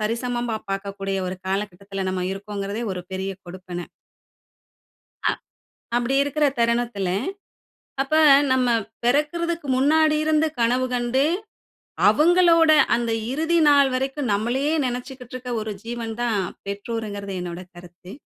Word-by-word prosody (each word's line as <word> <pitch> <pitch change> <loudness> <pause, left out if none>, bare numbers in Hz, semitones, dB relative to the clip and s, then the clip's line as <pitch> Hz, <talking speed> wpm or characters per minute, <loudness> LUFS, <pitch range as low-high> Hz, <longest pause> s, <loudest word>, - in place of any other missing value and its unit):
சரிசமமா 235 +1 -1
பார்க்கக்கூடிய 195 0 -3
ஒரு 185 - -5
காலகட்டத்தில 195 0 -3
நம்ம 185 -1 -2
இருக்கோங்கிறதே 200 +2 -5
ஒரு 180 - -4
பெரிய 190 +1 -3
கொடுப்பன. 180 -1 -7 1.4
அ. - - 0 0.7
அப்டி 245 +3 0
இருக்குற 290 +1 +1
தருணத்துல, 235 -5 0 0.9
அப்ப 275 +3 -2 0.4
நம்ம 255 -1 +2 0.4
பெறக்கிறதுக்கு 305 +5 0
முன்னாடி 305 +3 +4
இருந்து 310 0 +3
கனவு 250 +2 +2
கண்டு, 245 +3 +1 0.8
அவங்களோட 335 0 +5 0.2
அந்த 235 -1 0 0.2
இறுதி 320 +4 +1
நாள் 280 -2 +6
வரைக்கும் 265 -1 -1
நம்மளையே 250 +9 0
நெனைச்சுக்கிட்ருக்க 250 0 -5
ஒரு 215 0 -4
ஜீவன் 230 -1 -5
தான், 225 -4 +1 0.3
பெற்றோர்ங்கிறது 200 -1 -4
என்னோட 175 0 -5
கருத்து. 180 +2 -13
235 Hz, 110 wpm, -23 LUFS, 200-275 Hz, 1.4 s, நாள்